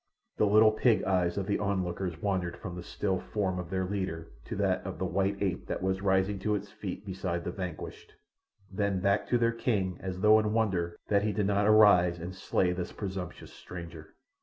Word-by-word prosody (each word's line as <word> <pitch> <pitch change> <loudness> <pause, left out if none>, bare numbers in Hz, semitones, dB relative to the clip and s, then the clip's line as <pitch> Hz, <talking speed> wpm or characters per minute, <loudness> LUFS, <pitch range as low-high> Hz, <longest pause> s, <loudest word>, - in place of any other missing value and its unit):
The 105 - +3
little 110 +1 +6
pig 110 +1 +2
eyes 90 -2 +1
of 100 - -1
the 100 0 0
onlookers 95 -4 -2
wandered 95 -4 -1
from 90 -4 -7
the 90 - -6
still 95 +1 -2
form 95 -4 -2
of 90 -3 -6
their 95 -1 -1
leader 90 -4 -3 0.2
to - - -5
that - - 0
of - - -6
the - - -2
white 100 +1 0
ape 90 -3 -2
that - - -3
was 95 0 0
rising 95 0 +1
to 105 +1 0
its 100 0 -5
feet 100 -2 -6
beside 90 -3 -3
the - - -3
vanquished, 90 -4 -7 0.6
then 100 -1 0
back 100 +2 +1
to 120 - +2
their 115 -1 +2
king 100 -6 -1
as 95 -1 -5
though 110 +1 +7
in 105 -1 0
wonder 95 -7 0
that 100 -1 +4
he 105 +1 0
did 105 -1 0
not 100 +1 +2
arise 100 -5 +6
and 85 +2 -6
slay 90 -1 0
this 90 0 -4
presumptuous 95 -3 -6
stranger. 85 -3 -10
95 Hz, 205 wpm, -30 LUFS, 90-105 Hz, 0.6 s, though